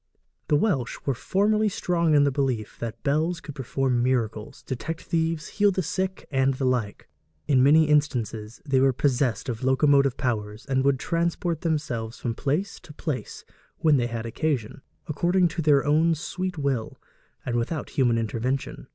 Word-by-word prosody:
The 150 - +3
Welsh 145 - 0
were 140 - +1
formerly 210 - +1
strong 170 -4 +1
in 145 - +6
the 140 - +2
belief 130 -6 -2
that 115 -1 -6
bells 160 +5 +1
could 145 - -9
perform 130 -2 -1
miracles, 115 -4 -1
detect 150 +5 -5
thieves, 165 -2 -1
heal 205 0 +3
the 185 -1 -1
sick, 190 +3 -3
and 135 -1 +2
the 130 - -2
like. 120 -5 -1 0.4
In 135 -4 +4
many 155 +4 +6
instances 120 -7 0
they 135 -3 +2
were 135 0 +4
possessed 130 -1 0
of 120 -1 -4
locomotive 140 0 +3
powers, 110 -4 -3
and 130 -1 0
would 140 -1 +3
transport 170 +1 -1
themselves 145 -9 -2
from 120 - -3
place 150 - -2
to 150 - -14
place 150 -3 -5 0.3
when 155 -3 +4
they 120 -2 +1
had 115 -1 -5
occasion, 130 -1 -2 0.2
according 175 +4 +2
to 165 - -3
their 145 -3 +4
own 160 +3 +3
sweet 180 +3 -4
will, 135 -6 -2 0.5
and 120 - -2
without 120 +7 -2
human 120 -4 +2
intervention. 115 +4 -3
140 Hz, 165 wpm, -25 LUFS, 120-160 Hz, 0.5 s, in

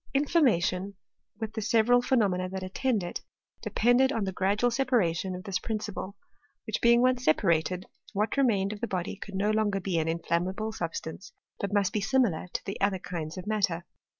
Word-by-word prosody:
Inflammation, 200 - +2 0.4
with 220 -1 -4
the 220 - -3
several 230 +3 +4
phenomena 195 -8 +1
that 190 0 -5
attend 210 +3 0
it, 175 - -5 0.4
depended 245 +4 +3
on 225 -6 -1
the 190 - -2
gradual 200 +6 +1
separation 195 -8 +1
of 180 - -7
this 190 -1 -2
prin 220 -2 -2
ciple, 210 -1 -6 0.5
which 220 - -2
being 235 +1 +5
once 255 -1 +2
separated, 170 +1 +2 0.3
what 210 +2 0
remained 215 -7 +2
of 205 - -10
the 235 - -1
body 185 0 -3
could 200 0 -9
no 205 +2 +1
longer 215 -2 +1
be 180 -3 -1
an 160 - -1
inflammable 175 +6 -1
substance, 170 0 -5 0.3
but 200 - -2
must 205 -2 +1
be 210 - 0
similar 200 -7 +1
to - - -3
the 195 - -5
other 200 -1 +2
kinds 170 -2 -6
of 185 - -6
matter. 195 -5 0
200 Hz, 180 wpm, -28 LUFS, 185-225 Hz, 0.5 s, being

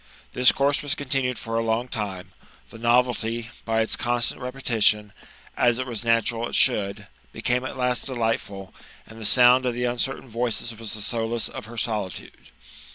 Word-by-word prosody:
This 125 0 +5
course 140 +1 +2
was 145 -1 -1
continued 130 -4 -1
for 115 0 -5
a - - 0
long 115 +2 0
time; 95 -6 -5 0.4
the 115 - -11
novelty, 120 -1 +1
by 115 0 +1
its 110 - +1
constant 120 +1 0
repetition 110 -5 +1 0.2
— - - -25
A 120 - +4
it 125 +2 -1
was 120 -3 -3
natural 115 0 +1
H - - -4
should 100 -6 +2
— 65 0 -33
became 125 +1 0
at 130 - -6
last 125 -2 +1
delightful; 115 -6 -2 0.3
and 110 0 -13
the - - -4
sound 125 +2 +6
of 120 - -1
the 125 0 -1
uncertain 125 +2 -2
voices 120 0 -2
was 110 0 -5
the 105 - -6
solace 115 +1 -1
of - - -8
her 120 +1 -11
solitude. 105 -5 -4
120 Hz, 180 wpm, -24 LUFS, 110-125 Hz, 0.4 s, sound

